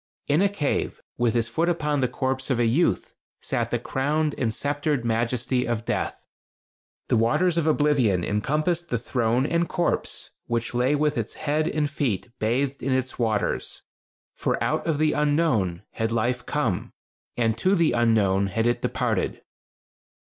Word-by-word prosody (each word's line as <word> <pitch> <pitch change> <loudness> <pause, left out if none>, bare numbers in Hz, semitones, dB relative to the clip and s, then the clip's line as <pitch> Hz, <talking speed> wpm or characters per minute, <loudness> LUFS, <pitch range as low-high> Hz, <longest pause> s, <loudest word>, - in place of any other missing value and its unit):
In 145 +4 +3
a 200 - +4
cave, 160 -8 -1 0.2
with 120 -1 +2
his 115 -1 +1
foot 165 +10 0
upon 150 -4 0
the 125 - +3
corpse 130 +1 -2
of 130 - +2
a 120 - +2
youth, 130 +10 +1 0.3
sat - - -1
the - - 0
crowned 150 +3 0
and 115 -3 0
sceptered 145 +1 -1
majesty 120 +2 0
of 115 -1 -2
Death. - - -3 0.8
The - - +3
waters 160 +11 +2
of 165 -2 +1
oblivion 140 - +3
encompassed 155 - 0
the 120 - +1
throne 120 +1 0
and 170 +2 0
corpse, 175 -2 -1 0.2
which 120 0 -1
lay 125 +4 +2
with 150 -2 +1
its 110 - -4
head 155 +1 0
and 150 -3 0
feet 125 - -2
bathed 130 +5 0
in 135 - -1
its 130 0 -1
waters 110 -3 -1 0.5
for - - -1
out - - -1
of 160 -3 +1
the 155 0 +3
Unknown 145 - +1
had 110 0 -2
life 120 +2 -1
come, 120 -11 -1 0.4
and 115 -2 +2
to 190 +2 +3
the 170 -4 +3
Unknown 105 -5 +3
had 115 +4 -1
it 120 0 +1
departed. - - -1
130 Hz, 165 wpm, -25 LUFS, 115-150 Hz, 0.8 s, a